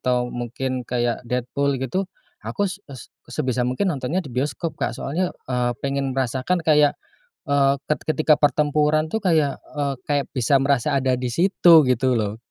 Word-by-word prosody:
atau 125 -1 0
mungkin 125 +1 -4
kayak 120 -1 -1
Deadpool 135 +3 -1
gitu, 180 +9 -2 0.3
aku 205 - -2
s 195 +1 -4
s 130 -3 -11 0.2
sebisa 130 -4 -2
mungkin 175 +8 0
nontonnya 150 +7 -2
di 130 - -9
bioskop 150 +5 -2
Kak, - - -3
soalnya, 175 +6 -2 0.2
eee, 120 -1 +1
pengen 135 -1 -2
merasakan 135 +7 -1
kayak, 150 -2 +4 0.5
eee, 140 -1 +3
ket 150 - 0
ketika 155 -1 +3
pertempuran 150 +1 +2
tuh 220 - -1
bisa - - 0
kayak, 150 -4 +2 0.2
eee, 140 -1 0
kayak 145 -3 0
bisa 125 +2 +2
merasa 140 -1 +1
ada 130 -1 +1
di 125 -1 -3
situ 175 +2 +4
gitu 130 +1 +2
loh. 105 +1 -2
140 Hz, 170 wpm, -22 LUFS, 125-155 Hz, 0.5 s, kayak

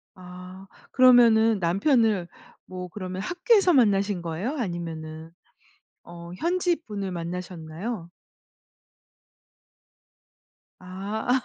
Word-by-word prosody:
아 180 +1 -11 0.3
그러면은 230 -4 +6
남편을 200 - +2 0.4
뭐 185 -1 -7
그러면 185 0 -6
학교에서 370 - +3
만나신 200 - +2
거예요? 175 - -3
아니면은 165 -5 -5 0.7
어 170 0 -11
현지 355 - 0
분을 200 -3 -4
만나셨나요? 175 +2 -6 2.7
아. 205 +7 -2
190 Hz, 195 characters per minute, -25 LUFS, 175-230 Hz, 2.7 s, 그러면은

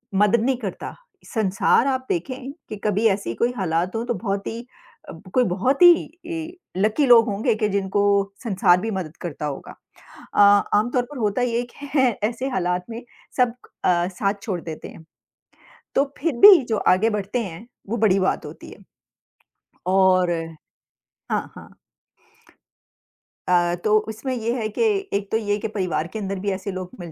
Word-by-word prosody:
मदद 210 +3 +3
नहीं 260 +2 +1
करता, 205 -7 -6 0.3
संसार 215 +3 +2
आप 260 -1 -1
देखें 255 +9 -3 0.2
कि - - -5
कभी 210 +1 +1
ऐसी 195 - -1
कोई 240 - +1
हालात 180 0 -1
हों 225 +1 -2
तो 240 - -1
बहुत 200 -1 -3
ही 225 - -4 0.5
अ, - - -6 0.2
कोई 255 - +4
बहुत 245 - 0
ही 335 -1 +3 0.3
लकी 215 +9 +2
लोग 235 -2 +7
होंगे 205 +2 0
कि 215 0 0
जिनको 200 0 0 0.4
संसार 185 -5 +3
भी 225 - -3
मदद 180 -6 -5
करता 155 -3 -5
होगा। 140 -2 -6 0.6
अ, - - -1 0.4
आमतौर 245 +4 +1
पर 290 - -8
होता 215 0 0
ये 240 -1 0
है 245 - -2 0.5
कि 210 - 0
ऐसे 240 +3 -4
हालात 180 -5 -1
में 230 +1 -6 0.4
सब 250 -2 +3 0.3
अ, 175 -1 +2
साथ 195 +2 -1
छोड़ 195 -4 -3
देते 160 -2 -7
हैं। 160 - -13 0.9
तो 275 - +4
फिर 325 0 -1
भी 395 -6 +10
जो 220 - +1
आगे 195 +3 +3
बढ़ते 210 +2 -2
हैं, 195 +3 -9 0.2
वो 230 - -1
बड़ी 200 -3 +3
बात 190 - 0
होती - - -10
है। - - -12 1.1
और 185 -1 +4 1.0
हाँ, - - -2
हाँ। - - -12 1.8
अ, 175 -1 +3
तो 215 0 +4
उसमें 225 +5 -4
ये 230 0 -2
है 230 -4 -2
कि - - +2 0.3
एक 200 0 -2
तो 220 - +2
ये 205 -2 -1
कि - - -3
परिवार 185 -6 -2
के 220 - -4
अंदर 195 -1 -4
भी 200 +2 -2
ऐसे 190 +1 -4
लोग 185 -1 -6
मिल 170 -2 -8
210 Hz, 170 wpm, -22 LUFS, 185-235 Hz, 1.8 s, भी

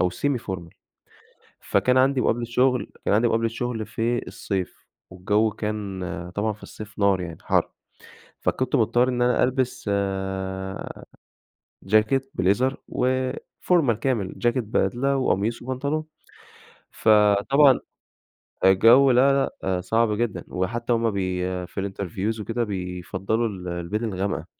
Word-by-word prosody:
أو 90 - +2
semi 140 +6 -1
formal. 85 -5 -6 0.9
فكان 125 0 +2
عندي 130 0 +3
مقابلة 120 +1 +1
شغل، 125 +1 +1
كان - - +2
عندي 115 +3 +4
مقابلة 115 0 +1
شغل 115 -1 -3
في 120 +1 -2
الصيف، 95 -3 -5 0.2
والجو 105 +4 +1
كان 105 -3 -4 0.3
طبعًا 105 +1 0
في 105 - -17
الصيف 105 -1 -10
نار 100 -2 +3
يعني 85 -2 -6
حَر، - - +1 0.7
فكنت 130 -1 0
مضطر 120 +2 +3
إن 125 -1 0
أنا 125 0 +3
ألبس 130 0 0
آآ، 95 -1 -3 0.8
جاكيت 110 +7 +2
بليزر 110 +9 +1
وفورمال 130 - 0
كامل، 115 -8 -1
جاكيت 120 0 +1
بدلة 130 +5 0
وقميص 115 -2 0
وبنطلون. 140 +5 -2 0.9
فطبعًا 110 +6 +4 0.9
الجو 115 +8 +6
لا 135 +2 +3
لأ 95 -1 -1
صعب 110 +4 +1
جدًا، 105 -7 -2
وحتى 115 +7 -2
هُم 115 -1 +1
بي 95 -2 -2 0.2
في 100 +2 -4
الinterviews 100 +3 -3
وكده 115 +3 -2
بيفضّلوا 95 +3 -2 0.3
البِدل 105 +7 -3
الغامقة. 95 +2 -2
110 Hz, 120 wpm, -24 LUFS, 95-125 Hz, 0.9 s, الجو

